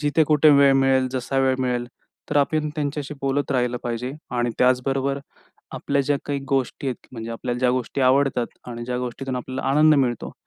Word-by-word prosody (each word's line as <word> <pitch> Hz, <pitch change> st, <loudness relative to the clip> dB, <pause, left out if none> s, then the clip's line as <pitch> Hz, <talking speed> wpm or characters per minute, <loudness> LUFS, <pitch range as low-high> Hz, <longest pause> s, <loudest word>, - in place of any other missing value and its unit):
जिथे 150 Hz, +2 st, +2 dB
कुठे 150 Hz, 0 st, +5 dB
वेळ 140 Hz, -1 st, +6 dB
मिळेल, 135 Hz, -1 st, +3 dB
जसा 130 Hz, +1 st, -2 dB
वेळ 130 Hz, -1 st, +3 dB
मिळेल 125 Hz, -1 st, -1 dB, 0.4 s
तर -, -, 0 dB
आपण 150 Hz, +2 st, +1 dB
त्यांच्याशी 145 Hz, -1 st, -3 dB
बोलत 135 Hz, +1 st, -1 dB
राहिलं 125 Hz, -1 st, 0 dB
पाहिजे. 120 Hz, +2 st, -3 dB, 0.2 s
आणि 120 Hz, -1 st, 0 dB
त्याचबरोबर 135 Hz, +2 st, +1 dB, 0.6 s
आपल्या 140 Hz, 0 st, 0 dB
ज्या 145 Hz, +1 st, +1 dB
काही 145 Hz, -1 st, -2 dB
गोष्टी 135 Hz, 0 st, -1 dB
आहेत 125 Hz, -, -4 dB
म्हणजे 115 Hz, -1 st, -6 dB
आपल्याला 120 Hz, +1 st, -3 dB
ज्या 125 Hz, -1 st, +3 dB
गोष्टी 130 Hz, +2 st, -2 dB
आवडतात 130 Hz, -1 st, +3 dB, 0.2 s
आणि 120 Hz, 0 st, -6 dB
ज्या 125 Hz, 0 st, -3 dB
गोष्टीतून 125 Hz, +1 st, -4 dB
आपल्याला 130 Hz, +1 st, -5 dB
आनंद 155 Hz, +2 st, +5 dB
मिळतो. 125 Hz, -5 st, 0 dB
130 Hz, 180 wpm, -23 LUFS, 125-140 Hz, 0.6 s, वेळ